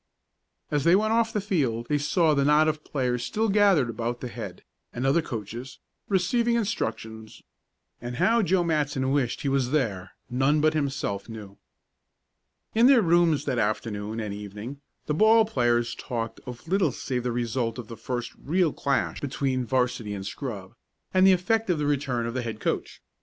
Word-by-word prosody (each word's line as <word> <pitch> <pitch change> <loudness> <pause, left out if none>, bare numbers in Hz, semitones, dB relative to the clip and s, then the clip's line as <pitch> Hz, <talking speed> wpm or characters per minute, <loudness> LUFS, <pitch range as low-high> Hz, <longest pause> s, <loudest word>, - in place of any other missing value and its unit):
As 145 -2 +1
they 170 +3 +5
went 215 +2 +2
off 230 0 +2
the 215 - -1
field 140 - -1
they 150 -1 +1
saw 155 +2 +2
the 140 -1 +2
knot 150 +2 +4
of 155 -1 -1
players 125 -3 -1
still 220 - -1
gathered 195 -9 +4
about 120 +1 -3
the 125 - -5
head, - - -8 0.3
and 125 +2 -4
other 140 +5 +3
coaches, 120 0 -7 0.3
receiving 230 +5 +2
instructions, 110 - -3 0.6
and 120 +1 -5
how 230 - +3
Joe 185 -2 +2
Matson 145 -5 0
wished 135 -4 0
he - - -2
was 135 -2 +1
there 105 -10 -1
none 135 +5 +2
but 155 +1 +3
himself 140 -9 -2
knew. 105 -3 -10 1.1
In 230 +3 +5
their 260 -5 +6
rooms 165 -4 +3
that 130 -4 0
afternoon 105 0 -2
and 105 -2 -4
evening 105 +7 -8 0.2
the 150 - -1
ball 220 +6 +5
players 120 - +1
talked 115 -2 -5
of 125 +4 -9
little 185 -4 +2
save 125 -1 -3
the 125 0 -2
result 120 0 -2
of 120 -3 -7
the 115 - -8
first 120 +2 -4
real 170 0 +1
clash 140 -1 -1
between 130 -2 -1
'varsity 125 -5 0
and 95 -1 -6
scrub, 100 -5 -6 0.4
and 185 0 +5
the - - +8
effect 195 +4 +1
of 175 - +2
the 150 - -1
return 135 -5 0
of 115 - -3
the 130 - -2
head 115 -2 -5
coach. - - -3
135 Hz, 180 wpm, -26 LUFS, 120-170 Hz, 1.1 s, the